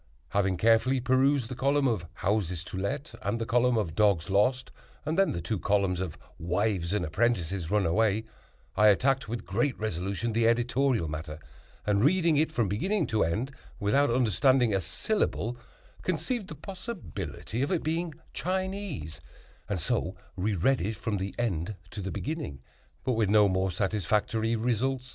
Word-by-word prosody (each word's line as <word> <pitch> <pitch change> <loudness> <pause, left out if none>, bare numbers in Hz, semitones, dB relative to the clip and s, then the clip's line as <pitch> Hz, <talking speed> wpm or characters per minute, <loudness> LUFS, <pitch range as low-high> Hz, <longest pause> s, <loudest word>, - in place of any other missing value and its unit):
Having 95 -2 +1
carefully 115 +6 +4
perused 130 0 +2
the 130 - -5
column 140 +2 +2
of 105 -9 -1
"houses 95 -4 -1
to 90 - -8
let," 130 +10 -3
and 105 +3 -1
the 115 - -1
column 125 +1 +3
of 85 -8 -1
"dogs 100 -5 +2
lost," 125 +6 +2 0.3
and 155 +2 0
then 195 +1 +3
the 85 - -4
two 95 +3 -2
columns 100 -2 +1
of 90 -5 -4 0.2
"wives 90 +1 0
and 105 - 0
apprentices 90 -1 0
runaway," 105 +2 +2 0.5
I 105 +2 +6
attacked 130 +4 +3
with 115 0 -4
great 120 +7 0
resolution 100 +2 -2
the 115 0 +3
editorial 120 -3 +2
matter, 75 +1 -5 0.5
and, 105 0 +2
reading 170 +1 +4
it 155 +2 +2
from 120 -9 +1
beginning 190 - 0
to 110 - +4
end 110 +12 -1 0.3
without 135 +8 +3
understanding 125 0 +3
a 95 - +1
syllable, 115 +7 -1 0.5
conceived 240 -7 -2
the 155 - -8
possibility 185 - -6
of 140 - 0
its 180 - 0
being 165 0 -1 0.2
Chinese, 185 - -3 0.5
and 100 - -1
so 80 - -1 0.2
re 100 +3 0
read 130 +10 +2
it 110 +3 -2
from 105 0 -2
the 95 +1 -4
end 100 -4 -1 0.2
to 105 - -6
the 95 - -3
beginning, 95 - -4 0.4
but 130 - 0
with 110 -3 +1
no 105 0 +6
more 95 0 +1
satisfactory 105 +4 0
result. 125 +3 0
110 Hz, 160 wpm, -29 LUFS, 95-130 Hz, 0.5 s, I